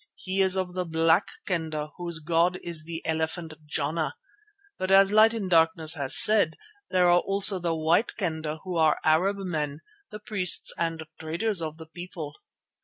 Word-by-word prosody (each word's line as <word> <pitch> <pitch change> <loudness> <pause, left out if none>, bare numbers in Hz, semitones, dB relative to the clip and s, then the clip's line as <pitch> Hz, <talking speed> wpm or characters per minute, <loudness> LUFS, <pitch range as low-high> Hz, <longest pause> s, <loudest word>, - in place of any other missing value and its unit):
He 190 +1 -2
is 190 0 +3
of 185 -1 -3
the 180 0 -2
Black 165 +2 +1 0.2
Kendah 155 -4 -3
whose 170 -2 -3
god 170 +3 +1
is 165 -3 -5
the 165 0 -4
elephant 160 +1 -3
Jana, 155 +1 -3 0.6
but 185 - -3
as 195 0 +5
Light 215 +1 +5
in 220 -4 -4
Darkness 165 -2 +2
has 140 -5 +3
said, 205 -7 +5 0.3
there 180 -1 +2
are 175 0 +5
also 195 0 +3
the 170 -2 -2
White 165 +8 +1
Kendah 160 -5 -4
who 185 -2 -4
are 160 -1 +3
Arab 180 +6 +2
men, 155 -6 -4 0.3
the 210 - -9
priests 200 -4 +1
and 165 -1 -3 0.2
traders 170 +5 -1
of 155 -1 -5
the 160 - -11
people. 160 -2 -9
170 Hz, 170 wpm, -26 LUFS, 160-185 Hz, 0.6 s, as